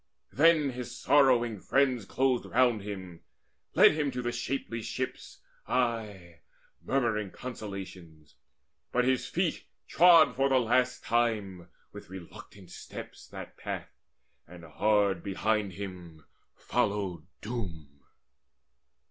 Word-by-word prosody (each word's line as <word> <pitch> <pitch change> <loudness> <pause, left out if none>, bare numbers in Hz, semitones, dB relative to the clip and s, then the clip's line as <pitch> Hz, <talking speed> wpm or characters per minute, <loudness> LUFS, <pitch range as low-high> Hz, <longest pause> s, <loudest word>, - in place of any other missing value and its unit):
Then 155 -1 +4
his 125 -1 -7
sorrowing 125 -6 +3
friends 130 -2 +1
Closed 130 +1 +1
round 120 -3 +2
him, 95 -4 -8 0.5
led - - +8
him 150 -2 -1
to 125 -1 -4
the 120 - -1
shapely 120 -1 -3
ships, 130 +3 -6 0.2
Aye 105 -9 -2 0.4
murmuring 115 -7 0
consolations. 95 -10 -9 0.6
But 125 0 +2
his 130 -1 +1
feet 175 +4 -1 0.2
Trod 170 +1 +6
for 135 0 +2
the 135 - +4
last 125 +1 +1
time, 105 -7 -1 0.2
with - - -11
reluctant 95 +1 -12
steps, - - -10
That - - -10
path; - - -6 0.6
and 90 0 -13
hard 100 +5 +1
behind 100 0 -1
him 90 -5 -9 0.3
followed 100 -4 -2
Doom. 85 - -6
110 Hz, 110 wpm, -29 LUFS, 95-125 Hz, 0.6 s, led